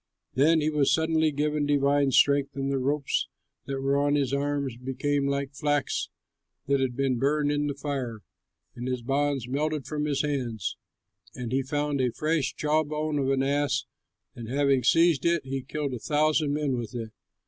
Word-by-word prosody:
Then 155 +5 +4
he 155 +1 +1
was 150 -3 +2
suddenly 160 -1 +2
given 150 0 0
divine 140 -1 +3
strength, 140 +1 +3
and 135 0 -2
the 135 - 0
ropes 140 +2 0 0.4
that 135 -1 -3
were 135 +1 +1
on 145 0 +2
his 140 -2 0
arms 140 -2 -1
became 135 +3 -1
like 140 0 -2
flax 145 0 -1 0.6
that 140 -1 +2
has 130 -1 +1
been 130 0 -1
burned 145 +2 +2
in 145 0 0
the 145 - -3
fire, 135 -6 -4 0.5
and 120 +1 -5
his 125 -2 -2
bonds 140 -1 0
melted 150 +2 -1
from 150 -1 -2
his 145 -1 0
hands. 125 -8 -2 0.6
And 120 -2 -5
he 135 +1 +2
found 145 +1 -1
a 125 -1 +1
fresh 155 +1 -1
jaw 155 +1 +1
bone 150 0 -2
of 135 -1 0
an 135 -1 +2
ass, 140 -1 0 0.5
and 115 -3 -8
having 140 -1 +2
seized 165 +2 +4
it, 170 -4 +1
he 135 0 -3
killed 145 +1 -4
a 125 - -4
thousand 150 +2 +1
men 145 -3 0
with 115 -1 -6
it. 115 -2 -5
140 Hz, 180 wpm, -27 LUFS, 135-150 Hz, 0.6 s, Then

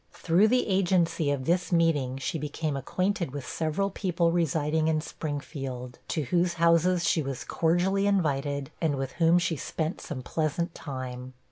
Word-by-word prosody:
Through 180 +5 +3
the 250 +3 +2
agency 180 -5 +2
of 140 -2 -1
this 175 +4 +1
meeting, 155 -7 +2
she 135 +4 -3
became 150 0 -3
acquainted 185 - -1
with 140 0 -6
several 170 +5 -1
people 175 -3 0
residing 160 -1 +1
in 160 -1 +2
Springfield, 140 -5 -5
to 155 - -1
whose 175 +5 +1
houses 170 +1 +3
she 160 - +3
was 135 0 -4
cordially 185 +4 +1
invited, 145 -7 0
and 160 -4 +1
with 135 -1 -3
whom 165 +1 +6
she 170 -2 0
spent 160 +4 -3
some 135 -6 -6
pleasant 160 +4 -1
time. 130 -2 -6
160 Hz, 155 wpm, -28 LUFS, 140-175 Hz, -, whom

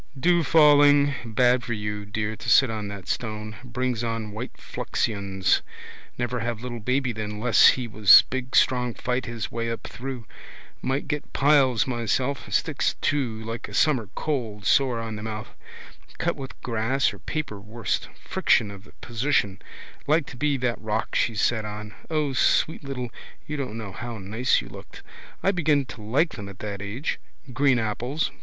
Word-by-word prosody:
Dew 175 +5 +4
falling. 145 -2 +6
Bad 120 +2 +2
for 120 - -3
you, 105 -1 -4
dear, 105 +1 -2
to - - -5
sit 130 -4 +6
on 105 -2 -4
that 100 -2 -8
stone. 110 -2 -3
Brings 125 -1 -2
on 115 -2 -3
white 110 +5 -7
fluxions. 100 -3 -1 0.6
Never 120 0 -1
have 115 -1 -3
little 120 -2 -5
baby 125 +3 0
then 105 -1 -5
less 115 0 +6
he 125 -2 +3
was 105 -3 +8
big 130 0 -3
strong 125 -2 +3
fight 125 0 -2
his 115 -3 -4
way 115 0 -2
up 115 - -4
through. 125 -2 -6 0.6
Might 135 +2 -1
get 150 -1 -3
piles 135 -5 +4
myself. 125 +3 -1
Sticks - - +1
too 120 -7 -1
like 115 +1 -5
a 100 - -8
summer 125 -5 +2
cold, 115 -9 -3
sore 125 +1 +3
on 115 -1 -5
the - - -7
mouth. 110 0 -5 0.7
Cut - - 0
with 135 -1 -9
grass 120 +3 +1
or - - -11
paper 150 -10 -4
worst. 110 +2 -3 0.2
Friction 100 - +2
of 100 0 -11
the - - -18
position. 120 -5 0 0.5
Like 155 +1 +3
to - - -10
be 145 +2 +1
that 125 -2 -1
rock 110 -1 -2
she 115 - +1
sat 110 +2 +1
on. 105 0 -7 0.2
O 150 -3 0
sweet 155 +4 +2
little, 125 -4 -5 0.3
you 150 - -4
don't 130 -6 -4
know 110 -4 -6
how 120 +4 -6
nice 110 +6 +1
you - - -10
looked. - - -12 0.4
I 195 - +4
begin 155 -6 +2
to 120 - -10
like 135 +11 +1
them 100 -1 -7
at 100 - -11
that 100 -2 -5
age. 110 +9 -3 0.3
Green 135 0 +3
apples. 120 +7 -1
120 Hz, 175 wpm, -25 LUFS, 110-135 Hz, 0.7 s, was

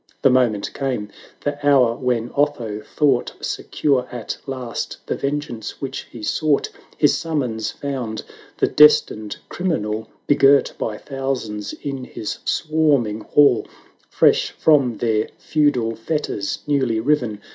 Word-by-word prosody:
The 135 - +6
moment 120 -5 +1
came, 125 -7 -2 0.3
the 145 0 -3
hour 130 -5 +4
when 120 -2 -1
Otho 120 -8 0
thought 135 -2 +1
Secure 135 -4 -1
at 120 -3 -4
last 130 -3 -4
the - - -1
vengeance 140 -6 -4
which 135 -1 -5
he 115 -3 -10
sought: 150 +4 +1 0.3
His 145 - +4
summons 125 -9 -2
found 120 -5 -4 0.3
the - - +3
destined 110 -8 +4
criminal 110 - -2 0.2
Begirt 140 -1 +4
by 105 -1 -2
thousands 130 -7 -4
in 135 -3 -6
bis 110 - -4
swarming 145 -9 +1
hall; 140 -1 +4
860 - - -22 0.3
Fresh - - +3
from 140 -8 +3
their 110 -2 +1
feudal 130 -7 +1
fetters 115 -5 -3
newly 130 -6 +1
riven. 120 -5 0
130 Hz, 125 wpm, -21 LUFS, 110-145 Hz, 0.3 s, The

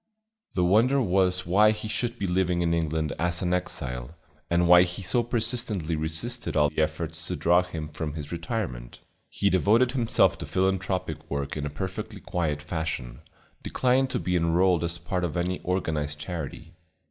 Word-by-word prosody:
The 90 - +2
wonder 115 +9 +4
was 90 -4 +2
why 100 +5 +5
he 110 0 -2
should 120 +2 -3
be 100 - -2
living 90 -1 +1
in 85 0 +1
England 80 -2 -1
as 85 +1 0
an 90 0 +1
exile, 65 -6 -3 0.3
and 85 0 +3
why 90 0 +9
he 90 +2 -2
so 120 +7 +2
persistently 115 -7 -1
resisted 80 +10 -2
all 75 -1 +4
efforts 80 +1 -2
to 90 - -2
draw 85 +1 +4
him 80 -4 -6
from 75 0 -5
his 75 -2 -6
retirement. 85 - -4 0.3
He 100 - +1
devoted 110 +7 +4
himself 120 -4 +2
to - - -6
philanthropic 90 -4 -1
work 70 0 -3
in 75 -1 -3
a - - -4
perfectly 95 +7 -5
quiet 75 -6 -2
fashion, 75 -7 -4 0.4
declining 130 +1 +2
to 130 - -2
be 90 +1 -1
enrolled 85 +1 +3
as 85 0 -1
part 90 +2 -3
of 85 -1 -2
any 90 +1 -1
organized 80 -5 -2
charity. 80 0 -6
90 Hz, 170 wpm, -26 LUFS, 80-95 Hz, 0.4 s, why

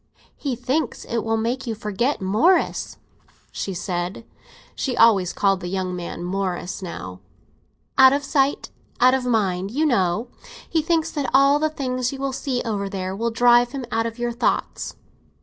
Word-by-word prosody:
"He 275 -4 -3
thinks 255 +3 -2
it 230 - -1
will 225 0 0
make 240 +4 -2
you 225 - -2
forget 220 +5 -1
Morris," 220 - +2 0.5
she 195 - -4
said 180 +3 -3 0.5
(she 255 -3 -3
always 200 -6 +5
called 195 -2 +1
the 175 - -6
young 185 0 -2
man 175 0 -6
"Morris" 185 0 -3
now); 90 - -7 0.8
"out 265 0 +9
of 285 +1 0
sight, 275 0 0 0.3
out 255 +1 +6
of 260 -1 0
mind, 195 -5 0
you 290 +8 0
know. 220 - +1 0.4
He 320 - +1
thinks 330 0 0
that 290 -4 -2
all 275 +2 +5
the 310 +1 +1
things 255 -4 -2
you 275 - -6
will 270 0 -2
see 255 -2 -2
over 200 -3 -2
there 190 -1 -4
will 230 +3 -1
drive 240 +1 +4
him 270 -3 -4
out 225 0 +1
of 230 +1 -7
your 240 0 -1
thoughts." 235 +1 -1
235 Hz, 170 wpm, -23 LUFS, 195-265 Hz, 0.8 s, out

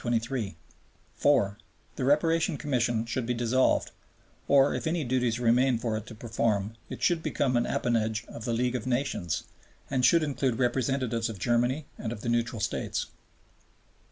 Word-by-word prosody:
(4) 105 -9 +2 0.4
The - - -3
Reparation 160 +4 +2
Commission 120 -6 0
should 115 +1 -3
be 125 - 0
dissolved, 120 +2 +2 0.6
or, 140 0 +5
if - - -3
any 165 0 0
duties 125 -2 0
remain 125 +1 +3
for 115 -1 -2
it 110 - -5
to 115 - -9
perform, 110 -2 -1 0.2
it - - -7
should 170 -2 +3
become 135 -5 0
an 120 - +2
appanage 115 -1 0
of 115 - -8
the 120 - -1
League 125 +2 +1
of 125 - -3
Nations 120 - -1 0.5
and 130 -2 +1
should 165 +6 +5
include 135 -5 0
representatives 125 -2 0
of 110 - -6
Germany 120 - +1
and 115 - -3
of 110 -3 -6
the 120 - -3
neutral 115 -1 0
States. - - -2
120 Hz, 155 wpm, -28 LUFS, 115-135 Hz, 0.6 s, or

